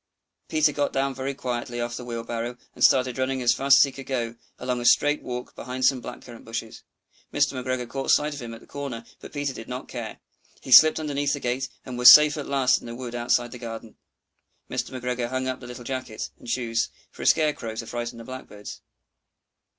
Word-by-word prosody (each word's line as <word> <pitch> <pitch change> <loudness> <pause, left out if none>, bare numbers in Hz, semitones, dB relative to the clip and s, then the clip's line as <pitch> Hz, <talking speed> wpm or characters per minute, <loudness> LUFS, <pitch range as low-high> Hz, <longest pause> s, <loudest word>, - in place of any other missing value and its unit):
Peter 155 -1 +3
got 145 0 -1
down 135 0 0
very 135 +1 -4
quietly 120 -2 -4
off 120 0 -3
the 125 - -6
wheelbarrow, 120 0 -4 0.2
and - - -3
started 130 -1 +4
running 130 0 0
as 120 - +5
fast 140 +1 +5
as - - +8
he 140 - -1
could 135 0 -10
go, 120 -4 -2 0.2
along 125 -1 -2
a - - -5
straight 145 +4 +4
walk 125 0 -6
behind 125 +1 -3
some 130 -3 +3
black - - -8
currant 120 -2 -12
bushes. 115 0 -6 0.5
Mr. - - +2
McGregor 130 -1 -3
caught 135 +2 -4
sight 150 0 +3
of 145 - -7
him 120 -1 -7
at - - -13
the - - -16
corner, 135 -5 -6
but - - -11
Peter 145 -2 -2
did 115 - -9
not 125 +1 -5
care. 120 -3 -6 0.5
He 130 - -8
slipped 155 +5 +9
underneath 145 -2 -1
the 145 - -2
gate, 125 +1 -2 0.2
and 125 -2 -6
was 125 - +11
safe 150 -1 +8
at 145 -2 -5
last 130 -2 +3
in - - -10
the 115 - -6
wood 125 -1 -6
outside 120 0 +1
the 125 - -9
garden. 115 -1 -8 0.8
Mr. - - -2
McGregor 125 -2 -3
hung 130 0 -2
up 130 0 -2
the 125 - -10
little 125 0 -8
jacket 130 -4 -5
and - - -14
the - - -2
shoes 115 -2 0 0.2
for - - -12
a - - -1
scare 155 -1 +4
crow 115 -5 -6
to 115 - -5
frighten 120 0 -5
the 115 - -9
Blackbirds. 115 -5 -9
125 Hz, 225 wpm, -25 LUFS, 120-135 Hz, 0.8 s, was